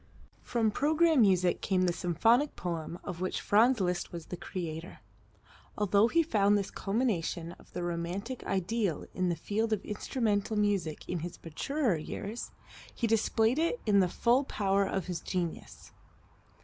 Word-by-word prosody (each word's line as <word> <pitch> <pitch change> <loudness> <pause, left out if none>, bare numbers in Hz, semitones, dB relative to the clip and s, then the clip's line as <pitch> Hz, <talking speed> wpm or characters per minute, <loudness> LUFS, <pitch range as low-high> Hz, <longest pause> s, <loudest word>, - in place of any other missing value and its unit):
From 225 -3 0
programme 310 +3 +3
music 185 -4 +3
came 185 -1 +1
the 180 -1 +2
symphonic 225 - +2
poem 170 -1 -4
of 180 -1 -6
which 185 - -1
Franz 230 +4 +4
Liszt 180 -2 -1
was 170 -2 -7
the - - -6
creator. 170 -1 -6 0.8
Although 205 +1 +4
he 335 +7 +3
found 205 -9 +3
this 200 - -3
culmination 195 -6 -1
of - - -19
the 175 - -3
romantic 175 +8 -3
ideal 195 -2 -1
in 185 -1 0
the 170 - 0
field 215 +7 -1
of 215 -3 -1
instrumental 210 -1 -1
music 200 -7 0
in 180 - -2
his 175 +2 -6
maturer 225 - -1
years, 200 +8 -5 0.5
he 235 - -1
displayed 225 +3 +2
in 335 +8 +2 0.2
it - - +7
the 185 -2 +3
full 240 +8 +2
power 200 -6 +1
of 190 -3 -2
his 180 -2 -3
genius. 175 -3 -4
200 Hz, 155 wpm, -30 LUFS, 175-225 Hz, 0.8 s, it